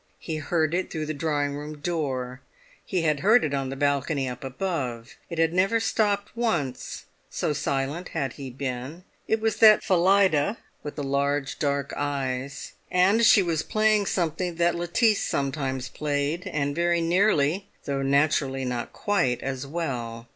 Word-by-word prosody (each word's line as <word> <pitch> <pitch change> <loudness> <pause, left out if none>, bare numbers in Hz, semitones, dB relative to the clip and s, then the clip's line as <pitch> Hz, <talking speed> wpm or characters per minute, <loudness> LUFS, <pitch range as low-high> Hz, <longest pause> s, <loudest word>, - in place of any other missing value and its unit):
He 160 -2 -5
heard 155 +1 0
it 185 +1 -1
through 155 -2 -3
the 155 - -3
drawing 145 -2 -1
room 150 +1 -7
door; 135 -6 -3 0.4
he 180 -4 -1
had 150 -3 +1
heard 225 +8 +5
it 145 - -1
on 135 -1 -1
the 135 - -4
balcony 140 0 0
up 125 0 -6
above; 130 -5 -3 0.2
it 170 - -5
had 165 0 +2
never 195 +5 +3
stopped 205 -1 0
once, 195 - -2 0.2
so 150 - -1
silent 140 +5 -2
had 140 -5 -2
he 135 -2 -7
been. 130 +5 -5 0.2
It 220 - +1
was 220 -1 0
that 215 -1 +7
Phillida, 190 -1 +3 0.2
with 150 - -7
the 145 - -4
large 140 0 -1
dark 140 -1 -1
eyes, 140 -1 -3 0.2
and 195 +5 +3
she 210 -3 +7
was 165 -3 0
playing 215 0 +2
something 175 0 -1
that 170 0 +2
Lettice 185 +6 +2
sometimes 135 -2 -2
played, 150 +3 -2
and 145 -1 -1
very 170 0 +2
nearly, 175 -1 +2 0.2
though 140 -1 -1
naturally 135 -1 +1
not 125 -1 -3
quite, 175 -13 0
as 135 0 -4
well. 120 -8 -4
150 Hz, 160 wpm, -26 LUFS, 135-180 Hz, 0.4 s, that